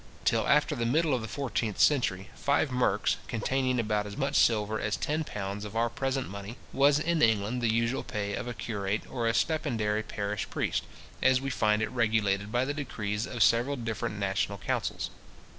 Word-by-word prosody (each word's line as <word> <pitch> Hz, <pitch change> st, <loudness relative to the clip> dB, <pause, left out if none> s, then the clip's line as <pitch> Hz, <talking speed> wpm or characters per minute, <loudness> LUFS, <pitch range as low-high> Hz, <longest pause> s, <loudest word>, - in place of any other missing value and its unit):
Till -, -, +2 dB
after 150 Hz, +1 st, +3 dB
the 115 Hz, -3 st, -1 dB
middle 155 Hz, +4 st, +2 dB
of 125 Hz, -, 0 dB
the 110 Hz, -, -5 dB
fourteenth 120 Hz, -5 st, -2 dB
century, 100 Hz, -9 st, +2 dB
five 140 Hz, +2 st, +1 dB
merks, 125 Hz, -5 st, +1 dB
containing 130 Hz, +2 st, 0 dB
about 105 Hz, -2 st, 0 dB
as 100 Hz, -, -8 dB
much 140 Hz, 0 st, -1 dB
silver 110 Hz, -1 st, +3 dB
as 105 Hz, -, -1 dB
ten 155 Hz, +2 st, -1 dB
pounds 100 Hz, -5 st, -5 dB
of 105 Hz, 0 st, -7 dB
our 115 Hz, 0 st, +1 dB
present 135 Hz, +1 st, -1 dB
money, 100 Hz, +4 st, -7 dB, 0.2 s
was 140 Hz, +1 st, +5 dB
in 160 Hz, +1 st, 0 dB
England 110 Hz, +2 st, +2 dB
the 115 Hz, -2 st, +2 dB
usual 115 Hz, +3 st, +1 dB
pay 100 Hz, -3 st, -3 dB
of 125 Hz, -, -4 dB
a 120 Hz, -, -3 dB
curate 105 Hz, -2 st, -2 dB
or 120 Hz, -3 st, -1 dB
a 115 Hz, -, +2 dB
stipendiary 115 Hz, -9 st, 0 dB
parish 105 Hz, -1 st, -3 dB
priest, -, -, -1 dB, 0.4 s
as 130 Hz, -1 st, +5 dB
we 135 Hz, +1 st, -3 dB
find 105 Hz, -2 st, +2 dB
it -, -, -2 dB
regulated 110 Hz, -4 st, +1 dB
by 120 Hz, +2 st, +2 dB
the 145 Hz, -, -2 dB
decrees 110 Hz, -7 st, -3 dB
of 120 Hz, -, +2 dB
several 120 Hz, +5 st, +3 dB
different 115 Hz, -4 st, -3 dB
national 100 Hz, 0 st, -1 dB
councils. -, -, -2 dB
115 Hz, 190 wpm, -29 LUFS, 105-130 Hz, 0.4 s, was